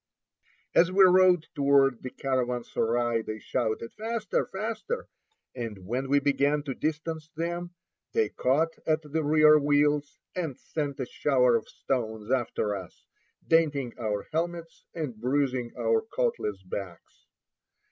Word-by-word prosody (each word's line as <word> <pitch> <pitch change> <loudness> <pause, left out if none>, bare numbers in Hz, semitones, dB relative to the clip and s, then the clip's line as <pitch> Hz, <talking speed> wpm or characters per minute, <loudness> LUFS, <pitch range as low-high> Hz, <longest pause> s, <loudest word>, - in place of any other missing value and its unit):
As 175 +2 +5
we 195 +1 +6
rode 185 -2 +6
toward 140 -3 +3
the 130 - -5
caravansary 120 -3 0
they 110 0 -5
shouted, 115 0 -2
"Faster, 225 0 -2
faster!" 225 - -4 0.5
and 110 -7 -6
when 130 +6 -2
we 145 +1 +5
began 145 +1 +1
to 140 -2 -3
distance 155 +2 -3
them, 175 +2 -3 0.4
they 445 -2 +1
caught 155 +6 0
at 155 0 +2
the 155 +2 -2
rear 155 0 +6
wheels, 145 0 +2 0.2
and 165 -8 -3
sent 145 -3 -4
a 130 - -1
shower 125 -2 +2
of 115 - -2
stones 110 -3 -3
after 115 -5 0
us, 95 -3 -10 0.4
denting 145 -7 +2
our 105 -3 -2
helmets, 165 +1 -3
and 150 -9 -4
bruising 130 -2 0
our 455 -2 +2
coatless 445 - -2
backs. 95 -1 -8
145 Hz, 130 wpm, -28 LUFS, 120-165 Hz, 0.5 s, we